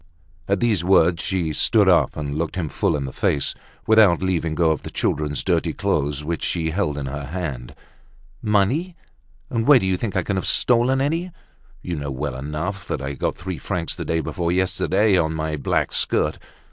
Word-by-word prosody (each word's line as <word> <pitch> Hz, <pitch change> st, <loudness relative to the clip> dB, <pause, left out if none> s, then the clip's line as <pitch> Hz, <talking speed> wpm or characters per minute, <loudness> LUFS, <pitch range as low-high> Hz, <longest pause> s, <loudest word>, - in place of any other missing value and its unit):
At 100 Hz, 0 st, 0 dB
these 110 Hz, -7 st, +2 dB
words 90 Hz, -1 st, +4 dB
she 85 Hz, -5 st, -1 dB
stood -, -, +3 dB
up -, -, +3 dB
and 70 Hz, -1 st, -3 dB
looked 80 Hz, +3 st, -2 dB
him 85 Hz, -5 st, -2 dB
full -, -, 0 dB
in 70 Hz, -, -3 dB
the 65 Hz, -, -7 dB
face, 70 Hz, -, 0 dB, 0.3 s
without 105 Hz, -5 st, +5 dB
leaving 85 Hz, -4 st, 0 dB
go 80 Hz, -1 st, +3 dB
of 80 Hz, -, -2 dB
the -, -, -7 dB
children's 75 Hz, -1 st, -1 dB
dirty -, -, 0 dB
clothes, 75 Hz, +1 st, -1 dB
which 85 Hz, +2 st, -3 dB
she 80 Hz, -2 st, -1 dB
held 85 Hz, -5 st, -1 dB
in 70 Hz, -, -3 dB
her 70 Hz, +2 st, -5 dB
hand. 70 Hz, -6 st, -5 dB, 0.7 s
"Money! 115 Hz, -, +1 dB, 0.6 s
And 115 Hz, -2 st, -1 dB
where 145 Hz, -2 st, +8 dB
do 110 Hz, -, 0 dB
you 95 Hz, -1 st, +1 dB
think 105 Hz, 0 st, -4 dB
I 95 Hz, -, +1 dB
can 100 Hz, +1 st, -2 dB
have 95 Hz, -, -2 dB
stolen 125 Hz, +2 st, +3 dB
any? 165 Hz, +6 st, -1 dB, 0.5 s
You 85 Hz, -3 st, -3 dB
know 70 Hz, -1 st, -4 dB
well 70 Hz, 0 st, -3 dB
enough 75 Hz, +9 st, -4 dB
that -, -, -2 dB
I 70 Hz, +1 st, -4 dB
got -, -, -2 dB
three 90 Hz, -1 st, -6 dB
francs 90 Hz, -4 st, -2 dB
the -, -, -5 dB
day 80 Hz, 0 st, -1 dB
before 85 Hz, +3 st, -2 dB
yesterday 95 Hz, +2 st, +2 dB
on 80 Hz, -1 st, 0 dB
my 80 Hz, 0 st, -2 dB
black 70 Hz, -, 0 dB
skirt. -, -, +1 dB
85 Hz, 195 wpm, -22 LUFS, 75-100 Hz, 0.7 s, where